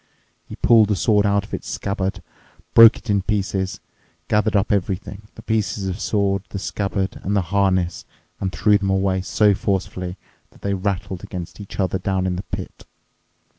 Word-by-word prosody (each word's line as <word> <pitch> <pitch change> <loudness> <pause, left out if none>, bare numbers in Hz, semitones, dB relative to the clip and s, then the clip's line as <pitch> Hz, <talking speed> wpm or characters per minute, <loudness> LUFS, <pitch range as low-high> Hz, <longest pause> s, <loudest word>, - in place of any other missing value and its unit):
He - - -7
pulled 110 -2 +5
the 105 - +1
sword 105 +1 +3
out 100 0 +2
of - - -14
its - - -5
scabbard, 100 -1 -3 0.5
broke 115 -1 +9
it - - -14
in 100 -2 +2
pieces, 95 -2 -2 0.5
gathered 105 +1 +2
up 100 +2 +2
everything—the 100 +1 -3
pieces 110 -2 -1
of 95 - -1
the - - -10
sword, 100 -2 +1
the - - -5
scabbard, 100 -1 -2
and 100 +2 -1
the 90 -4 -1
harness—and 95 -1 -1
threw 105 +3 +3
them 100 -1 -1
away 95 -1 +1
so 105 +2 +3
forcefully 95 -2 -2 0.3
that - - -22
they 100 - 0
rattled 95 -1 -3
against 85 0 -7
each 100 - -10
other 95 -1 0
down 95 -1 -1
in 90 -1 0
the 90 - -3
pit. - - -7
100 Hz, 170 wpm, -21 LUFS, 95-105 Hz, 0.5 s, broke